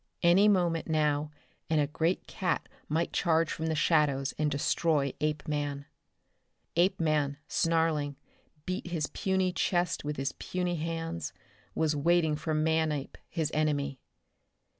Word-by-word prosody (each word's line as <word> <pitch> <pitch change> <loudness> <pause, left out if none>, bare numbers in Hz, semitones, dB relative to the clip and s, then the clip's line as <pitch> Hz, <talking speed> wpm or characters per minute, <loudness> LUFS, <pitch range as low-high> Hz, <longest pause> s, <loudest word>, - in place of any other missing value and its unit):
Any 180 +4 +6
moment 175 -5 +2
now 150 -1 +1 0.4
and 160 -1 +3
a 145 - +3
great 160 +5 -1
cat 180 -2 -2 0.2
might 160 +3 0
charge 165 -1 +2
from 160 - -3
the 160 - 0
shadows 150 -4 +2
and 150 0 +1
destroy 145 -1 +1
Apeman. 150 -2 -2 0.9
Apeman, 155 -5 +2
snarling, 160 -3 +1 0.5
beating 185 -1 -3
his 155 -3 0
puny 190 +1 0
chest 175 -2 0
with 150 0 -3
his 135 0 -1
puny 180 -1 -2
hands, 165 - -3 0.4
was 155 -1 +1
waiting 160 +1 +3
for 155 +1 -2
Manape 155 -2 0
his 160 -3 -1
enemy. 145 -3 0
155 Hz, 125 wpm, -30 LUFS, 150-170 Hz, 0.9 s, Any